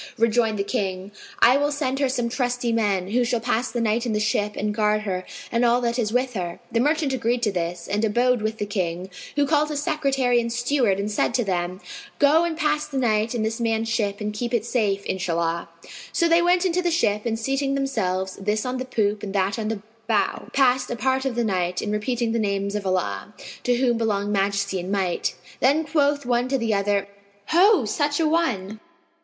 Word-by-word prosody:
Rejoined 225 -1 +2
the 200 - 0
King, 190 -1 -3 0.3
"I 250 +3 +7
will 290 +1 +1
send 275 -2 -1
her 275 -2 +2
some 245 -2 -1
trusty 245 -1 -1
men, 200 -5 0
who 245 +2 +3
shall 240 0 0
pass 235 +1 0
the 240 - -3
night 230 0 +1
in 225 - -1
the 210 - +1
ship 210 -1 0
and 210 +1 -1
guard 210 0 +1
her 185 -3 -3 0.3
and 235 +1 +1
all 240 0 +4
that 235 0 -1
is 215 -3 0
with 250 +1 0
her." 175 -4 -4
The 230 - +1
merchant 295 +1 +1
agreed 240 -1 0
to 210 - +2
this 170 -1 -3
and 205 +2 -1
abode 240 +2 +2
with 220 +1 -2
the 205 - -2
King, 185 -2 -3 0.2
who 290 -1 +3
called 300 +1 +2
his 295 -1 -2
secretary 270 -5 +1
and 235 0 -3
steward 240 -4 +1
and 205 +1 -2
said 205 - 0
to 245 - +2
them, 180 -1 -2 0.4
"Go 295 +3 +5
and 330 -2 -3
pass 300 -2 0
the 280 -3 -5
night 225 -2 +1
in 225 - 0
this 225 +2 -2
man's 225 -1 0
ship 205 -3 -1
and 210 0 -3
keep 240 +3 -2
it 225 -2 0
safe, 205 -5 0
Inshallah!" 170 -2 -1 0.4
So 340 - +2
they 335 +1 +4
went 355 +1 +3
up - - -1
into 365 0 +1
the 350 - +1
ship 215 - +1
and 225 -1 -1
seating 270 +4 -1
themselves, 190 -9 -1
this 210 +3 -1
on 255 0 -2
the 255 - -4
poop 210 -4 0
and 205 -1 -6
that 195 +3 +1
on 215 - -2
the 215 -2 -3 0.2
bow, 220 -3 0
passed 255 -2 +2
a - - -2
part 265 +2 0
of 260 -3 -1
the 240 - +1
night 180 -4 0
in 210 - -2
repeating 230 +2 -1
the 230 - 0
names 200 -1 -1
of 205 -2 -3
Allah 100 - -2 0.3
(to 245 - +3
whom 240 -2 +1
belong 205 -2 0
Majesty 195 -1 0
and 180 +2 -5
Might!). 190 -3 -1 0.2
Then 290 +5 +3
quoth 285 -2 +1
one 245 0 +1
to 270 +1 +1
the 230 -3 0
other, 200 0 +1 0.4
"Ho, 360 - +5
such 290 +7 0
an 315 -2 +2
one! 220 - 0
230 Hz, 220 wpm, -24 LUFS, 200-260 Hz, 0.4 s, I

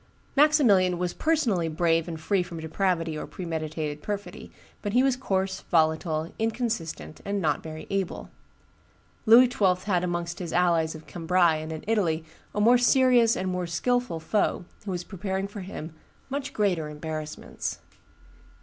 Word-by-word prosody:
Maximilian 240 - +5
was 180 0 -2
personally 245 - +1
brave 165 0 +1
and 165 -2 -5
free 190 +4 +1
from 175 -2 -6
depravity 165 0 -1
or 150 - -5
premeditated 155 -3 -4
perfidy, 205 +2 -6 0.3
but 205 -1 -3
he 250 +2 +5
was 270 -2 +3
coarse, 190 -6 -1
volatile, 160 0 +1
inconsistent, 220 - -3
and 200 0 -2
not 150 -6 0
very 155 -1 -8
able. 195 -2 -3 1.0
Louis 240 +3 +9
XII. 190 -6 +3
had 180 -4 +1
amongst 175 -1 -2
his 175 -3 -5
allies 170 -2 +2
of 155 - -11
Cambrai 170 -1 +2
and 155 +1 -6
in 160 -1 -6
Italy 175 -7 +1 0.3
a - - 0
more 240 +4 +6
serious 245 -2 +4
and 185 - -2
more 180 -1 -2
skilful 245 +1 0
foe, 180 +2 0 0.2
who - - -5
was 180 -2 -2
preparing 190 +1 -3
for 205 +1 -8
him 180 -4 -7 0.4
much 280 0 -3
greater 180 -7 0
embarrassments. 155 0 -5
180 Hz, 150 wpm, -26 LUFS, 160-210 Hz, 1.0 s, Louis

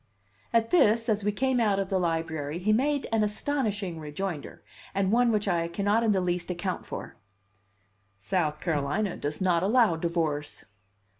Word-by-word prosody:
At 230 -1 +2
this, 230 -8 +4
as 210 -1 +1
we 210 - +1
came 260 +3 +1
out 210 -4 +2
of 195 -1 -1
the 190 -2 +1
Library, 165 -3 -2
he 205 +4 +1
made 280 +4 +1
an 225 -1 +2
astonishing 210 - -2
rejoinder, 155 +1 -5 0.3
and 195 0 +1
one 240 +1 +4
which 210 -1 0
I 170 -3 +1
cannot 205 +6 +1
in 225 -2 +2
the 195 - +2
least 180 0 -1
account 180 +1 -3
for: - - -7 1.0
"South 150 - -1
Carolina 165 +6 -1
does 150 +5 -3
not 175 -3 +2
allow 215 -2 +4
divorce." 160 -3 -2
195 Hz, 160 wpm, -27 LUFS, 165-215 Hz, 1.0 s, this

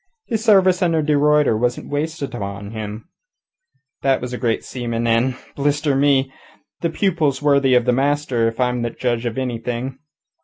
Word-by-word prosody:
His 220 -3 -2
service 190 -4 +4
under 165 -3 +2
de 150 0 +2
Ruyter 150 -3 +3
wasn't 120 +4 -2
wasted 145 -1 -3
on 100 -2 -6
him. 110 +3 -6 0.9
That 135 -1 +2
was 125 0 -6
a - - -3
great 115 -3 0
seaman, 120 -2 -3
and 115 +3 +2 0.2
blister 145 0 +1
me! 135 -1 +2 0.5
the 170 - -1
pupil's 165 -6 0
worthy 140 -3 +4
the 125 0 +2
master 135 -3 +1
if 115 +1 -4
I 125 -1 +3
am 125 -1 -2
a 120 - -1
judge 120 0 -2
of 115 - -4
anything. 125 +1 -3
130 Hz, 165 wpm, -20 LUFS, 120-145 Hz, 0.9 s, service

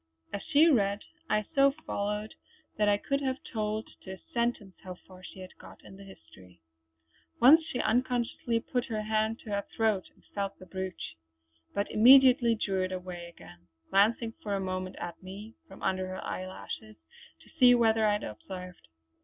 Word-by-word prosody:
As 200 - -3
she 300 +2 +6
read 205 -8 +2 0.3
I 215 0 +1
so 275 -1 +5
followed 210 +1 -3 0.4
that 210 -1 +2
I 205 - +4
could 275 +6 -2
have 260 -1 -1 0.2
told 215 0 -2
to 190 - -8
a - - -9 0.2
sentence 235 -5 -1
how 185 -1 -7
far 185 0 -17
she 185 - -10
had 185 - -11
got - - -14
in - - -12
the 200 - -12
history. 90 - -16 0.8
Once 295 +7 +8
she 255 -5 -5
unconsciously 240 -1 0
put 245 0 -2
her 220 -4 -3
hand 220 +1 0
to 215 - -9
her 200 0 0 0.2
throat 215 -4 +1
and - - -27
felt 200 -1 -3
the 185 - -13
brooch; 185 - -6 0.6
but 200 - +1
immediately 250 0 +7
drew 195 -3 -1
it 185 0 -2
away 180 -2 -6
again, 90 - -15 0.2
glancing 225 +4 +3
for 205 -2 -2
a - - -1
moment 185 -1 -4
at 175 - -7
me 200 +4 -9
from - - -13
under 185 0 0
her 185 0 -6
eyelashes 185 -12 -6 0.4
to - - -20
see 245 -1 +8
whether 225 -2 +3
I 210 - +3
had 210 - -2
observed. 180 - -9
205 Hz, 180 wpm, -29 LUFS, 185-230 Hz, 0.8 s, Once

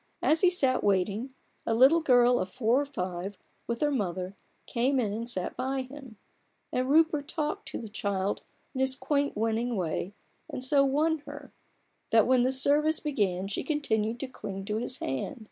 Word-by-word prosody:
As 315 +1 +3
he 365 - +6
sat 270 -8 +1
waiting, 205 +6 0 0.3
a 225 - 0
little 270 +8 +6
girl 245 -5 +4
of 185 - -2
four 245 +3 +2
or 290 - -4
five, 185 -6 -4 0.3
with 235 0 -3
her 295 -1 +2
mother, 190 -6 -2 0.3
came 255 +3 +1
in 210 -5 0
and 230 +2 -3
sat 185 -6 -2
by 265 +1 -2
him: 260 -4 -12 0.5
and 255 +1 -1
Rupert 305 -1 +3
talked 310 -2 -3
to - - -5
the 230 - -7
child 200 -2 -2 0.3
in 260 - -2
his 265 0 +2
quaint, 285 -3 -1
winning 225 +2 0
way, 180 +2 -3 0.3
and 255 - -4
so 275 +1 +4
won 305 +4 +1
her, 290 -1 -9 0.6
that 225 -2 +5
when 255 -1 +4
the 255 +2 +2
service 290 +4 +3
began 195 - -1
she 200 - -3
continued 230 -7 -1
to 275 - -3
cling 195 -6 -7
to 210 +1 -2
his 245 +3 -3
hand. 135 - -4
250 Hz, 180 wpm, -28 LUFS, 210-280 Hz, 0.6 s, he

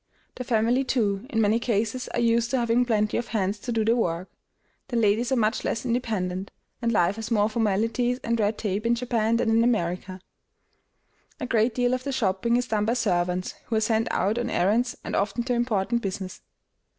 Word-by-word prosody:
The 255 - -6
family, 240 +2 +2
too, 215 -4 0
in 225 - -1
many 215 +2 +3
cases 230 +1 -1
are - - -3
used 235 0 +2
to 265 - +1
having 240 0 +2
plenty 215 -3 +1
of 240 - -3
hands 205 -2 -1
to 240 - -5
do 225 -2 +1
the 230 +2 +3
work; 180 -5 -2 0.6
the 240 - -2
ladies 230 +3 +2
are - - +3
much 220 -1 +1
less 230 +2 -2
independent, 205 -6 -2 0.3
and 235 -1 +1
life 190 -1 +2
has 225 0 -5
more 210 -3 +3
formalities 225 +3 0
and 230 0 0
red 210 0 +1
tape 210 +1 -2
in 235 - +3
Japan 230 -2 0
than 225 - +1
in 225 +1 +4
America. 185 -4 -1 1.2
A - - -3
great 230 -1 +1
deal 245 0 +2
of 255 0 -2
the 280 - -3
shopping 235 0 +1
is 245 0 -1
done 210 -1 +1
by 230 - +1
servants, 180 -5 0
who 230 - -2
are - - +3
sent 220 +1 +1
out 215 +5 0
on 240 0 -2
errands 225 +8 +1
and - - -4
often 205 +4 0
do 250 +1 -1
important 235 -1 0
business. 190 -2 -5
225 Hz, 200 wpm, -25 LUFS, 205-240 Hz, 1.2 s, in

